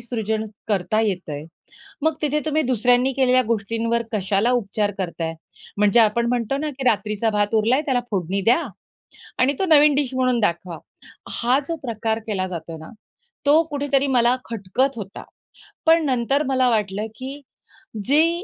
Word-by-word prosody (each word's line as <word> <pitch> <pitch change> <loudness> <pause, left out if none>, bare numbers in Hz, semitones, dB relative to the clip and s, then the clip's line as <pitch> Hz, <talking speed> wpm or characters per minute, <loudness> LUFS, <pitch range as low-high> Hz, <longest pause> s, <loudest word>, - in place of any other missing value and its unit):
सृजन 220 -2 -2 0.2
करता 205 +1 +1
येतंय. 175 -8 -3 0.6
मग 320 0 +2
तिथे 300 0 +1
तुम्ही 310 +1 +1
दुसऱ्यांनी 245 +1 +2
केलेल्या 255 -1 +3
गोष्टींवर 230 +2 0
कशाला 200 +2 +1
उपचार 210 -3 0
करताय, 165 -3 -3 0.4
म्हणजे 210 +3 +4
आपण 230 +2 +3
म्हणतो 245 +2 0
ना, 305 +1 -2
की 265 -1 -7
रात्रीचा 215 -1 +1
भात 205 +1 0
उरलाय, 230 +6 +3
त्याला 265 -5 0
फोडणी 190 0 -1
द्या 290 +8 +4 0.8
आणि 265 +3 +3
तो - - +1
नवीन 300 -2 +6
डीश 275 -2 -1
म्हणून 255 -2 +1
दाखवा. 170 -4 -1 0.5
हा 245 +3 +1
जो 335 - -2
प्रकार 225 -3 -2
केला 190 -3 -1
जातोय 165 -2 -6
ना, 160 - -11 0.6
तो 305 +3 +6
कुठेतरी 280 -1 0
मला 245 -2 +3
खटकत 235 +5 -1
होता. 200 -2 -8 0.6
पण 325 -1 +5
नंतर 265 +2 +1
मला 260 -2 +2
वाटलं, 210 -2 -1
की 270 +4 -7 0.6
जी 330 +6 +2
235 Hz, 150 wpm, -22 LUFS, 205-270 Hz, 0.8 s, नवीन